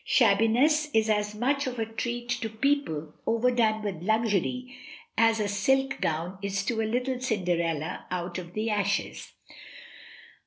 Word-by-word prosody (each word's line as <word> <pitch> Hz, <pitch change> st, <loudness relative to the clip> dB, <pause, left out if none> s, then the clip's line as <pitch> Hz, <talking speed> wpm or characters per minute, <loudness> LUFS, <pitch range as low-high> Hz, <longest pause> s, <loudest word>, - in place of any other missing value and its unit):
Shabbiness 245 Hz, +8 st, +3 dB
is 220 Hz, 0 st, +3 dB
as 210 Hz, 0 st, 0 dB
much 275 Hz, +5 st, 0 dB
of 250 Hz, -1 st, -4 dB
a 225 Hz, -, 0 dB
treat 240 Hz, +2 st, -4 dB
to 225 Hz, -2 st, -1 dB
people 220 Hz, -, -1 dB
overdone 230 Hz, -2 st, +2 dB
with 190 Hz, -6 st, -4 dB
luxury 225 Hz, +5 st, 0 dB, 0.4 s
as 225 Hz, 0 st, +4 dB
a 210 Hz, -, 0 dB
silk 270 Hz, +7 st, +1 dB
gown 170 Hz, +4 st, -2 dB
is 195 Hz, -1 st, -2 dB
to 225 Hz, +1 st, 0 dB
a 220 Hz, -, -1 dB
little 250 Hz, +1 st, -1 dB
Cinderella 175 Hz, -, -1 dB
out 180 Hz, 0 st, -3 dB
of 175 Hz, 0 st, -10 dB
the 220 Hz, +1 st, -1 dB
ashes. 200 Hz, -1 st, -1 dB
220 Hz, 145 wpm, -27 LUFS, 195-245 Hz, 0.4 s, as